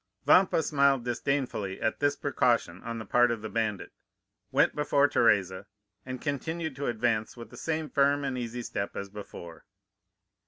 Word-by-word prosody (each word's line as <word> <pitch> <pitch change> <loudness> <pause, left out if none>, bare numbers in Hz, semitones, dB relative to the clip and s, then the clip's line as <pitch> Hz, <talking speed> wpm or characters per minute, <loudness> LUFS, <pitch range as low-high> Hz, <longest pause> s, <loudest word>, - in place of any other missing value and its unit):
"Vampa 180 -3 +5
smiled 140 -4 +2
disdainfully 120 -5 -2
at 110 - -1
this 145 0 +2
precaution 115 -11 0
on 115 0 -5
the 110 - -6
part 120 +4 +4
of 115 -2 -3
the 110 - -4
bandit, 110 -3 -2 0.6
went - - +3
before 145 -1 +3
Teresa, 100 -8 +2 0.4
and 130 -1 -5
continued 160 +2 -3
to 140 - -3
advance 110 -1 -1
with 115 -2 -10
the - - -11
same 155 +5 -2
firm 140 +1 +2
and 135 -2 -2
easy 120 0 -4
step 100 -3 -4
as 100 0 -5
before. 85 -5 -10
120 Hz, 160 wpm, -28 LUFS, 110-140 Hz, 0.6 s, Vampa